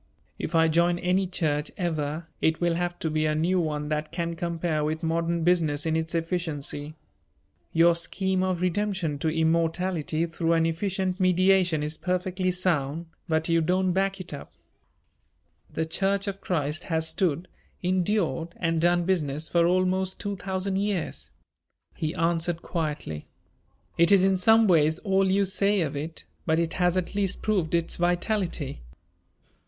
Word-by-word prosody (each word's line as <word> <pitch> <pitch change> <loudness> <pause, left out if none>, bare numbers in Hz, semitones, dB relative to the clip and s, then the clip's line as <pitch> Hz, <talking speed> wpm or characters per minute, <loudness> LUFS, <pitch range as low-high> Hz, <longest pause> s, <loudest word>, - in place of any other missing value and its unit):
If - - -3
I 165 0 +5
join 170 +2 +2
any 185 +2 +1
church 150 -4 -1
ever 160 -3 -2 0.2
it 160 0 +2
will 175 -1 +1
have 175 +1 -2
to 160 - 0
be 155 0 +1
a 155 - 0
new 175 +4 +1
one 150 -3 -2
that 155 0 -2
can 170 -1 -3
compare 165 -2 -1
with 155 +1 -2
modern 165 +1 0
business 160 -4 +2
in 160 0 +1
its 160 +1 -2
efficiency. 160 -3 -3 0.8
Your 170 +1 +5
scheme 190 +2 0
of 185 -2 -1
redemption 180 -5 -1
to 160 - 0
immortality 165 0 0
through 165 0 0
an 165 -1 +3
efficient 185 +2 -1
mediation 185 -3 +3
is 150 +1 -3
perfectly 185 +1 -1
sound, 170 -4 0 0.2
but 160 0 +1
you 165 -1 +3
don't 185 +3 +1
back 195 +1 0
it 180 -4 -5
up." 140 - -8 1.2
"The 160 - -1
Church 195 +4 0
of 200 -1 -5
Christ 155 -3 -2
has 160 -1 0
stood, 170 0 0 0.4
endured 180 -4 0
and 165 -2 0
done 175 +1 +3
business 155 -4 -1
for 170 -1 +3
almost 185 +1 +1
two 205 0 -3
thousand 190 0 -2
years," 200 -3 -2 0.6
he 155 +1 -3
answered 170 0 0
quietly. 150 - -4 0.7
"It 170 +2 +6
is 195 -2 +6
in 190 -1 +3
some 220 +3 +5
ways 160 -3 +4
all 195 -1 +1
you 200 +1 +3
say 200 +1 +2
of 150 -3 -2
it, 155 +3 -5 0.2
but 160 0 +3
it 165 -1 0
has 180 0 +1
at 185 - -2
least 200 -2 -1
proved 185 -7 +1
its 170 0 0
vitality. 175 - -1
170 Hz, 160 wpm, -26 LUFS, 160-185 Hz, 1.2 s, It